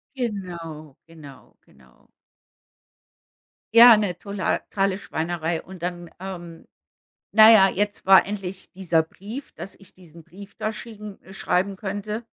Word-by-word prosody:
Genau, 170 - -6 0.2
genau, 145 -5 -15
genau. 65 -1 -25 1.7
Ja, 235 -1 +10
'ne 200 -4 -1
totale 195 -1 -2
Schweinerei. 165 -1 -3
Und, 185 -1 -12
dann, 175 -1 -5
ähm, 175 -3 -9 0.7
na 220 +1 +9
ja, 200 -4 +7
jetzt 205 +2 -2
war 190 0 +7
endlich 195 -2 -7
dieser 175 -4 0
Brief, 215 - -10
dass 195 - -9
ich 195 -2 -18
diesen 170 -3 -16
Brief 195 +4 -14
da 215 0 -3
schicken 215 -2 -10
schreiben 195 +1 -1
könnte. 205 +3 -5
190 Hz, 120 wpm, -23 LUFS, 170-205 Hz, 1.7 s, Ja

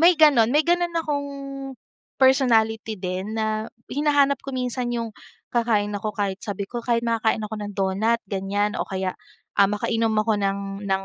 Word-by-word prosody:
may 340 +1 +6
gano'n 280 -8 +6
may 300 +4 +3
gano'n 345 0 +2
akong 290 -3 -2 0.9
personality 225 -5 +3
din, 185 +3 -4
na 220 0 -1 0.2
hinahanap 285 -1 +3
ko 275 - -6
minsan 250 0 -2
yung 230 -1 -2 0.4
kakain 225 -4 +1
ako 210 0 -4
kahit 200 -2 -1
sabi 200 -2 -4
ko, 240 +5 -6
"Kahit 235 0 0
makakain 225 -1 +1
ako 215 0 -4
ng 205 -1 -5
donut" 200 +4 +1
ganyan 200 +2 -1
o - - -2
kaya, 190 -1 -2 0.5
ah, 200 - +7
makainom 225 +2 0
ako 215 -1 +1
ng 200 0 0 0.3
ng 195 0 0
220 Hz, 165 wpm, -24 LUFS, 205-255 Hz, 0.9 s, ah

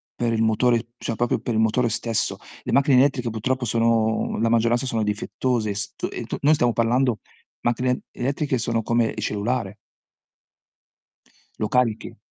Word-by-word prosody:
per 120 -1 0
il 110 - 0
motore 115 +1 +2
cioè, 115 - -3
proprio 120 +1 0
per 120 - -3
il 110 - +2
motore 115 +2 +2
stesso. 115 0 -1 0.3
Le - - -4
macchine 140 -1 +4
elettriche 130 -2 +3
purtroppo 125 +3 -2
sono 115 -1 +1
la 115 - +2
maggioranza 115 +2 +2
sono 115 -3 -1
difettose. 110 +1 -1
St 105 0 -4
e - - -5
t - - -5
noi 150 +2 +5
stiamo 120 -5 +2
parlando 120 0 +1 0.4
macchine 125 +1 0
elettriche 140 +1 -1
sono 115 0 -1
come 115 0 +2
il 110 - -5
cellulare 105 0 -2 1.8
lo 110 - -1
carichi. 125 -3 0
115 Hz, 155 wpm, -23 LUFS, 110-125 Hz, 1.8 s, noi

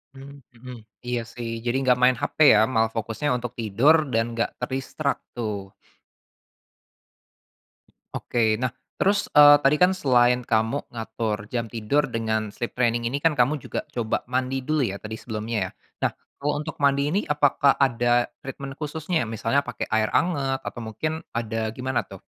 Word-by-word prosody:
Mmm, 140 +1 -11 0.2
mhm, 125 +2 -10 0.3
iya 120 0 0
sih, 120 -1 -5 0.2
jadi 120 +1 0
nggak 125 -1 +3
main 125 0 +5
HP - - -3 0.2
ya, - - +5
malah 110 -1 +2
fokusnya 115 +5 -3
untuk 120 -1 -5
tidur 115 +8 +4 0.2
dan 115 0 +3
nggak 115 0 0
ke 125 - -1
distract 140 +2 -2
tuh. 105 -4 -4 2.4
Oke, 120 - -3 0.2
nah 125 -1 0 0.3
terus, 200 +1 +2
eee, 145 0 +10
tadi 135 +2 +5
kan 180 - +6
selain 125 -8 +3
kamu 110 +4 +1
ngatur 110 -1 -3 0.2
jam 115 -1 -1
tidur 120 +6 0
dengan 110 -2 -1
sleep 120 - -4
training 120 -1 +1
ini 135 +4 -2
kan 160 0 +2
kamu 140 +4 +2
juga - - -4
coba 115 -3 -1
mandi 130 +1 -1
dulu 155 +2 0
ya - - -6
tadi 110 +1 -5
sebelumnya 110 0 -4
ya. - - -19 0.4
Nah - - -7 0.3
kalau 145 +1 0
untuk 160 +1 -6
mandi 140 -1 +3
ini 195 - +2
apakah 140 -1 +3
ada 120 -2 +2
treatment 135 0 -7
khususnya, 160 +2 -2
misalnya 115 +4 0
pakai 125 - -4
air 110 -1 +2
anget 140 -6 +1
atau - - -6
mungkin 135 +8 -3 0.2
ada 115 -1 -2 0.2
gimana 130 0 -1
tuh? - - -10
125 Hz, 165 wpm, -24 LUFS, 115-140 Hz, 2.4 s, eee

